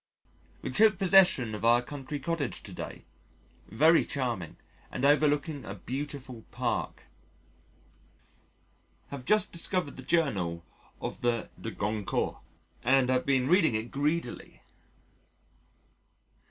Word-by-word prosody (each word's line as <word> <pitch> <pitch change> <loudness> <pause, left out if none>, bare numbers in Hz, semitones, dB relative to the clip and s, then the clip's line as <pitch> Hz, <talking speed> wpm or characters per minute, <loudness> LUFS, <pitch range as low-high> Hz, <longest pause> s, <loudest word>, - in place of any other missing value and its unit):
We - - -3
took 215 -2 +4
possession 180 - +4
of 105 - -6
our 120 +1 +4
country 145 +2 -6
cottage 150 -2 -3
to - - -9
day: - - -8 0.6
very 155 - +5
charming 120 - -3 0.3
and 130 - -2
overlooking 145 0 +2
a 95 - -7
beautiful 130 +1 -6
Park. - - -3 2.1
Have 140 -3 -7
just 215 +5 +3
discovered 170 -2 0
the - - -6
Journal 105 - 0 0.3
of - - -6
the 120 -2 -1
De 115 - -4
Goncourts 105 0 -2 0.4
and 130 0 +3
been 130 -2 +2
reading 170 - +4
it 110 +2 -3
greedily. 145 -1 -3
135 Hz, 110 wpm, -29 LUFS, 115-155 Hz, 2.1 s, very